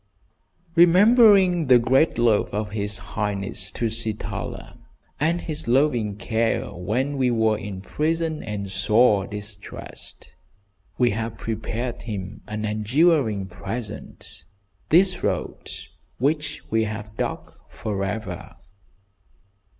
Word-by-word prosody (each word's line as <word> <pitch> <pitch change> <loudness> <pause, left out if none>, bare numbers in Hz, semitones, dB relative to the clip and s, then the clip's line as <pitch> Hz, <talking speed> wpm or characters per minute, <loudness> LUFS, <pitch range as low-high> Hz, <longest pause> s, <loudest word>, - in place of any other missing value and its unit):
" - - -46 0.3
"Remembering 185 - +6
the 125 -1 +8
great 130 +6 +3
love 115 -3 +3
of 105 0 -3
his 105 0 -1 0.2
highness, 100 -1 -2
Tusitala, 110 +1 -3 0.4
and 165 +4 +1
his 155 -6 -4
loving 120 -5 +2
care 110 +3 -1
when 125 +11 -2
we 130 -2 +2
were 110 -2 +2
in 100 -3 -6
prison 160 - -1
and 105 -2 -4
sore 105 -1 +3
distressed, 105 0 -8 0.6
we 120 -2 +3
have 110 +2 -3
prepared 115 +2 -4
him 100 -5 -6
an 105 0 -3
enduring 110 - +2
present, 100 -2 -7 0.4
this 185 +3 +4
road - - -3 0.5
which 150 +3 -1
we 110 0 +2
have 110 0 -6
dug - - -4 0.2
for 105 -3 -4
ever." 105 +3 -5
115 Hz, 110 wpm, -24 LUFS, 105-145 Hz, 0.6 s, the